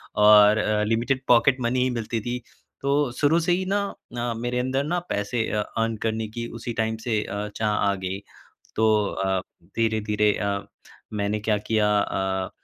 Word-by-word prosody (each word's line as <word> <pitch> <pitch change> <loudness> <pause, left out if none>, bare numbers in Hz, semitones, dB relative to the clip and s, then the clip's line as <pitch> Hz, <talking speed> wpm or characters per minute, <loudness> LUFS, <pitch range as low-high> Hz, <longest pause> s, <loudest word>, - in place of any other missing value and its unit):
और 105 0 +7
अ, 105 0 +1
limited 115 +5 0
pocket 125 +2 +5
money 125 +1 +1
ही 130 - +1
मिलती 115 0 -3
थी। 120 +3 -3 0.4
तो 140 -1 +1
शुरू 155 +3 +4
से 170 +1 0
ही 185 +2 +1
ना 200 +2 +1 0.4
अ, 120 0 -1
मेरे 120 +1 -2
अंदर 130 +2 0
ना 175 +5 -1
पैसे 110 +3 -1
अ, 105 - 0
अर्न 115 +2 -2
करने 110 0 -1
की 115 0 -3
उसी 115 +1 -4
टाइम 110 0 -1
से 110 -3 +1
अ, 100 +1 -4
चाह 110 -1 0
आ 100 -1 +2
गई। 95 +1 -3 0.6
तो 110 -1 +3
अ, 95 0 -1 0.4
धीरे-धीरे 105 -2 +1
अ, 100 0 -1 0.5
मैंने 105 0 -1
क्या 105 0 +1
किया 105 -2 +3
अ, 95 -1 -2
110 Hz, 175 wpm, -24 LUFS, 105-120 Hz, 0.6 s, और